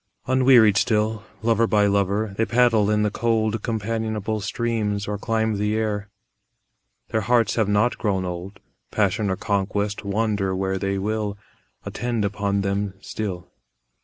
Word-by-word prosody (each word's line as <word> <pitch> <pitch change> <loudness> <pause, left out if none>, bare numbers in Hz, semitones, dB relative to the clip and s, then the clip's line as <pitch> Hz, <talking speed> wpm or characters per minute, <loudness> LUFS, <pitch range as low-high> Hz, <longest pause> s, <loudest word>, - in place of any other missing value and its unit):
Unwearied 125 -5 +5
still, 110 0 +1 0.2
lover 115 0 +3
by 105 -2 +3
lover, 100 +1 +1
They 115 - +1
paddle 115 -4 +3
in 105 0 +2
the 105 - +1
cold 110 -1 0
Companionable 110 -1 -2
streams 105 -2 -2
or 105 -1 -3
climb 110 -1 0
the 105 +1 0
air; 105 -2 -2 1.0
Their 110 - 0
hearts 115 0 +2
have 110 -3 +1
not 105 +4 +2
grown 95 -4 0
old; 90 +2 -6 0.3
Passion 105 0 +1
or 95 - 0
conquest, 100 +1 -1
wander 100 -2 0
where 95 0 -1
they 100 0 -1
will, 105 +1 -2 0.5
Attend 120 -3 -2
upon 100 0 -1
them 100 0 -2
still. 95 -4 -5
105 Hz, 140 wpm, -23 LUFS, 100-110 Hz, 1.0 s, Unwearied